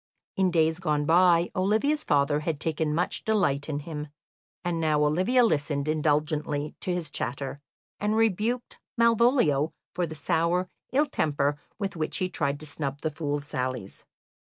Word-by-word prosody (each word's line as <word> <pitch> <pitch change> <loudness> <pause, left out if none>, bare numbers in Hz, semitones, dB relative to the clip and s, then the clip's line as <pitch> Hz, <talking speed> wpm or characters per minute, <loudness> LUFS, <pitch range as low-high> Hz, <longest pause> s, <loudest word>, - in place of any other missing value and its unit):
In 190 -1 +3
days 160 -1 +2
gone 150 -4 0
by, 170 +1 +4
Olivia's 220 +11 +1
father 145 +1 +2
had 155 -1 -2
taken 155 -1 -1
much 175 +2 -1
delight 160 -10 +1
in 145 -1 -2
him, 150 -1 -6 0.6
and 170 -1 -1
now 155 -2 +2
Olivia 185 +12 +3
listened 150 -7 0
indulgently 150 -1 0
to 185 - -3
his 175 -4 -3
chatter, 140 +2 -4 0.4
and 210 +1 0
rebuked 225 +3 0 0.2
Malvolio 230 - +3 0.2
for 175 -1 -1
the 155 - -7
sour 170 +4 +1 0.2
ill 285 +4 +3
temper 145 - 0 0.2
with 200 -4 -3
which 155 -2 -2
he 185 -1 -1
tried 145 -5 -1
to - - -6
snub 145 -2 -4
the 155 - -1
fool's 145 -2 -3
sallies. 130 -7 -4
160 Hz, 155 wpm, -27 LUFS, 145-185 Hz, 0.6 s, by